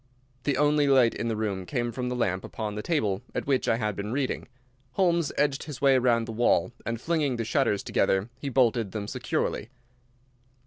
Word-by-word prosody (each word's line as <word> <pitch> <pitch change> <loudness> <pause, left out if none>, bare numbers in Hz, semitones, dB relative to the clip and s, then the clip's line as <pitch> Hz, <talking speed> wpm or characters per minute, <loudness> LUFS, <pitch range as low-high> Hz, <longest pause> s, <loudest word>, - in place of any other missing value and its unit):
The 140 -3 +1
only 150 0 +3
light 130 -4 +5
in 115 - -3
the 115 - -1
room 100 -4 -3
came 120 -4 -1
from 125 +1 -3
the 125 - -2
lamp 95 -6 0
upon 110 -2 -5
the 105 - -4
table 105 - 0
at - - -2
which 135 -2 +1
I 115 - +3
had 105 -3 -1
been 100 +3 -4
reading. 135 0 -2 0.5
Holmes 170 -5 +2
edged 140 -1 +1
his 145 -4 -7
way 135 -1 +5
round 120 -2 +2
the - - -4
wall 120 +1 +2 0.2
and 115 -1 -2
flinging 150 -2 0
the 115 -1 -3
shutters 115 -5 +1
together, 95 +1 +1
he 140 - -3
bolted 120 -5 +2
them 105 -2 -4
securely. 105 - -2
120 Hz, 195 wpm, -27 LUFS, 110-140 Hz, 0.5 s, light